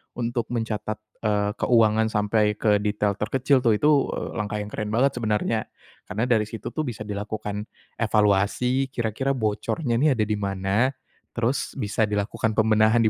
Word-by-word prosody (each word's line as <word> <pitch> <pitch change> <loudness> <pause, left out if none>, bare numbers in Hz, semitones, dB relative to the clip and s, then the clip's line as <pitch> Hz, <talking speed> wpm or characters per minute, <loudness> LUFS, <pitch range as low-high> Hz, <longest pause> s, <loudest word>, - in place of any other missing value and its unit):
untuk 120 0 -2
mencatat, 110 -2 -2 0.2
eee, 105 -2 +1
keuangan 110 -2 +4
sampai 105 0 +1
ke 105 -2 +2
detail 105 -1 -1
terkecil 130 +5 +2
tuh, 115 -4 +3
itu, 150 +8 +3 0.3
eee, - - -4
langkah 105 0 -2
yang 105 - -9
keren 105 0 -4
banget 135 +4 +4
sebenarnya. 110 0 0 0.4
Karena 110 +4 -2
dari 110 -3 +3
situ 110 +1 -6
tuh 155 -3 -2
bisa 110 -3 -5
dilakukan 105 0 -4 0.3
evaluasi 110 +5 +2
kira-kira 130 +2 -1
bocornya 120 +3 -1
ini 145 -1 +4
ada 110 - +1
di 105 0 -1
mana, 100 +4 +1 0.5
terus 120 +3 -1
bisa 110 -3 0
dilakukan 105 +1 -1
pembenahan 110 +1 +4
di 110 - +4
110 Hz, 155 wpm, -24 LUFS, 105-120 Hz, 0.5 s, keuangan